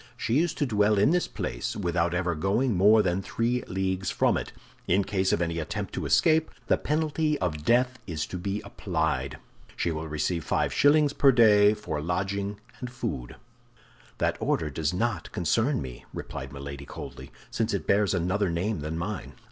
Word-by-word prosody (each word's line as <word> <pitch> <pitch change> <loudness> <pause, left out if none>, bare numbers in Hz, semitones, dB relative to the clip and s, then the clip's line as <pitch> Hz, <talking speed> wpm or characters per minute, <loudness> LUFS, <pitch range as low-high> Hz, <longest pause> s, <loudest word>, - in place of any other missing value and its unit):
She 120 +6 +1
is 170 0 0
to 145 - 0
dwell 105 -3 +2
in 105 +9 +4
this 180 0 +2
place - - -4
without 85 -2 0
ever 90 -1 0
going 100 +9 +1
more 105 +4 +6
than 90 0 0
three 120 +5 -1
leagues 95 0 -1
from - - +2
it. - - -3 0.4
In 95 +3 +3
case 95 -1 0
of 85 - +2
any 85 -1 -2
attempt 75 - -4
to - - -3
escape, 160 -1 +3 0.2
the - - +3
penalty 155 0 0
of 80 - -2
death 125 +6 +2
is 80 -4 -2
to 90 - -6
be 100 +3 -2
applied. 80 -8 -2 0.4
She 85 - 0
will 80 0 -4
receive 80 +2 -1
five - - 0
shillings 145 0 +4
per 140 -1 +5
day 105 -4 +6
for 75 -8 -4
lodging 100 +4 -2 0.2
and 125 -1 -6
food'". 65 - -4 0.8
"That - - 0
order 75 -2 0
does 75 +2 -1
not 115 +7 -2
concern 110 - +1
me," 60 -2 -9
replied 65 0 -6
Milady, 70 0 -7
coldly, - - -8 0.2
"since - - 0
it - - -2
bears 100 -1 +2
another 90 +3 0
name 90 +4 -1
than 75 +2 -4
mine." 90 0 -4
95 Hz, 180 wpm, -27 LUFS, 85-115 Hz, 0.8 s, more